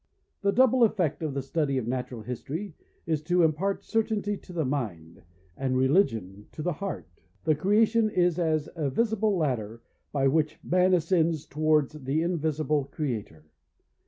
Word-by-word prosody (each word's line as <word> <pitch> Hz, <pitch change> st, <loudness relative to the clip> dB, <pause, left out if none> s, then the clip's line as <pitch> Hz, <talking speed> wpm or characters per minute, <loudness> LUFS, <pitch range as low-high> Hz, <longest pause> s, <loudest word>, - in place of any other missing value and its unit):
The 200 Hz, 0 st, +2 dB
double 255 Hz, +2 st, +4 dB
effect 180 Hz, -10 st, +1 dB
of 155 Hz, -4 st, -3 dB
the 140 Hz, -, -2 dB
study 140 Hz, -1 st, 0 dB
of 125 Hz, -, -1 dB
Natural 125 Hz, -2 st, -3 dB
History 155 Hz, -, -5 dB, 0.3 s
is 160 Hz, -3 st, 0 dB
to 175 Hz, +1 st, +3 dB
impart 170 Hz, +5 st, 0 dB
certainty 215 Hz, -2 st, 0 dB
to 190 Hz, -, -13 dB
the 165 Hz, -4 st, -1 dB
mind, 100 Hz, -, -4 dB, 0.3 s
and 130 Hz, -1 st, -1 dB
religion 115 Hz, -, +1 dB
to 155 Hz, -, -6 dB
the 180 Hz, -, 0 dB
heart. 195 Hz, +6 st, -5 dB, 0.4 s
The 155 Hz, -, +3 dB
creation 215 Hz, +7 st, +3 dB
is 180 Hz, -3 st, +1 dB
as 155 Hz, -3 st, +1 dB
a 150 Hz, -4 st, -1 dB
visible 215 Hz, -, +1 dB
ladder 115 Hz, -7 st, -2 dB, 0.3 s
by 135 Hz, -2 st, +2 dB
which 155 Hz, +2 st, +1 dB
man 185 Hz, +1 st, +3 dB
ascends 165 Hz, -2 st, +1 dB
towards 155 Hz, -1 st, +1 dB
the 150 Hz, +2 st, -1 dB
invisible 155 Hz, -4 st, 0 dB
Creator. 115 Hz, -, -5 dB
155 Hz, 155 wpm, -27 LUFS, 135-185 Hz, 0.4 s, double